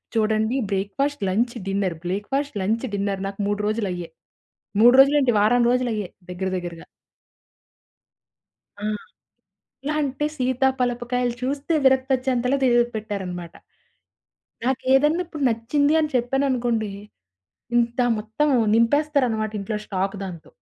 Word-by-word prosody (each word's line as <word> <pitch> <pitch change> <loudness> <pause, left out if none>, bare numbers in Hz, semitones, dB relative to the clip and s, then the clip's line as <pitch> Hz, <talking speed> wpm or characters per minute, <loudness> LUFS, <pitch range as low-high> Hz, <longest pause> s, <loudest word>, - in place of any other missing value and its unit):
చూడండి 220 +2 +1
breakfast, 205 +9 -1
lunch, 235 +6 0
dinner, 195 -3 -1
breakfast, 215 +8 -2
lunch, 225 +6 0
dinner 200 -1 -2
నాకు 195 +1 -8
3 205 0 -1
రోజులయ్యే. 190 -6 -2 0.7
3 240 +2 +8
రోజులేంటి 275 -2 +4
వారం 240 +4 +4
రోజులయ్యే 235 -6 0 0.2
దగ్గర, 190 +1 -3
దగ్గరగా. 175 -2 -7 2.0
ఆ! - - -5 1.0
ఎలాఅంటే, 295 -1 -1
సీత 255 -1 -1 0.2
పలపకాయలు 245 0 0
చూస్తే 280 +5 -2
విరక్తొచెంతలా 260 -1 +2
తి 260 - +4 0.3
పెట్టారనమాట. 185 -5 -5 1.1
నాకేదన్నా 270 +6 +2
ఇప్పుడు 310 -3 -7
నచ్చింది 255 +6 +1
అని 305 - 0
చెప్పాననుకోండి. 245 -3 0 0.9
ఇంత 235 0 +1 0.2
మొత్తం 220 +8 -1 0.3
నింపేస్తారనమాట 235 -2 +2
ఇంట్లో 210 +2 -3
స్టాక్ 195 +1 -2
దాంతో. 175 -4 -9
240 Hz, 100 wpm, -23 LUFS, 205-265 Hz, 2.0 s, 3